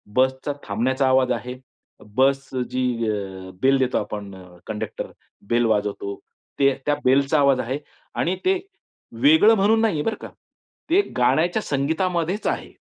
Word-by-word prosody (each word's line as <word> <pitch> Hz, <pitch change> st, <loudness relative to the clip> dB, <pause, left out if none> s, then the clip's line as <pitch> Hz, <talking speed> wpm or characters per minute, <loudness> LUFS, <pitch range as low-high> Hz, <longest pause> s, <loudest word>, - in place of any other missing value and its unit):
बसचा 130 Hz, +2 st, +1 dB
थांबण्याचा 130 Hz, +6 st, 0 dB
आवाज 130 Hz, -1 st, +3 dB
आहे. 125 Hz, 0 st, -3 dB, 0.6 s
बस 135 Hz, +1 st, +2 dB, 0.2 s
जी 130 Hz, 0 st, 0 dB, 0.2 s
अ, 95 Hz, -3 st, -5 dB
बेल 135 Hz, +1 st, +4 dB
देतो 130 Hz, -1 st, +1 dB
आपण 100 Hz, -2 st, -5 dB, 0.3 s
कंडक्टर 105 Hz, -1 st, -5 dB, 0.4 s
बेल 120 Hz, 0 st, +3 dB
वाजवतो 105 Hz, -2 st, -1 dB, 0.4 s
ते 140 Hz, -1 st, +4 dB
त्या 145 Hz, -, +2 dB
बेलचा 135 Hz, +3 st, +3 dB
आवाज 140 Hz, -2 st, +4 dB
आहे 130 Hz, +4 st, -2 dB, 0.4 s
आणि 180 Hz, +2 st, 0 dB
ते 380 Hz, 0 st, +3 dB, 0.6 s
वेगळं 285 Hz, -7 st, +6 dB
म्हणून 220 Hz, +2 st, +3 dB
नाहीये 175 Hz, -10 st, +1 dB
बरं 225 Hz, -, -1 dB
का. -, -, -7 dB, 0.6 s
ते 360 Hz, +5 st, +5 dB, 0.2 s
गाण्याच्या 155 Hz, -, +2 dB
संगीतामध्येच 170 Hz, +6 st, -1 dB
आहे. -, -, -3 dB
135 Hz, 135 wpm, -23 LUFS, 125-170 Hz, 0.6 s, वेगळं